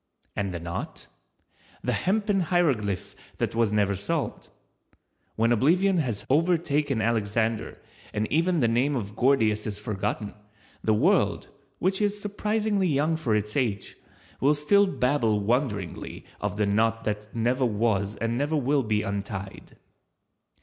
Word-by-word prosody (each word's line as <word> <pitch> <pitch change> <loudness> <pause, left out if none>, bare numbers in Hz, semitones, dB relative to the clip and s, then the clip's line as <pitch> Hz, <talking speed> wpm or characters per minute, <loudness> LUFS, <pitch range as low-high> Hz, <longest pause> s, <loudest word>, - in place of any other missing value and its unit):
And 100 -2 -1
the 85 - -4
knot? 85 +1 -6 0.8
The - - 0
hempen 200 -1 +1
hieroglyph 120 - +1 0.2
that - - -1
was 115 -2 +2
never 100 -2 +2
solved. 125 - -3 0.9
When 115 +2 +2
oblivion 175 - +3
has 120 -10 -1
overtaken 150 -5 +1
Alexander 110 0 0 0.3
and 105 0 -1
even 170 +1 +2
the 120 - +4
name 125 +5 +1
of 105 -4 -4
Gordius 110 -5 +2
is 105 -1 -3
forgotten, 105 0 -3 0.5
the 110 - +3
world, 175 - +2 0.3
which 190 +2 0
is 205 0 +1
surprisingly 210 -1 0
young 155 +1 +1
for 125 -9 0
its 105 0 -2
age, 110 -8 -1 0.4
will 145 +3 +4
still 200 +8 +4
babble 125 - +1
wonderingly 105 - -2
of 105 0 -3
the 105 - +2
knot 110 +3 +1
that 105 0 -4
never 120 +3 +1
was 105 -2 0
and 115 +3 -2
never 145 +2 0
will 140 +1 +2
be 110 -3 0
untied. 100 -1 -5
115 Hz, 135 wpm, -26 LUFS, 105-155 Hz, 0.9 s, the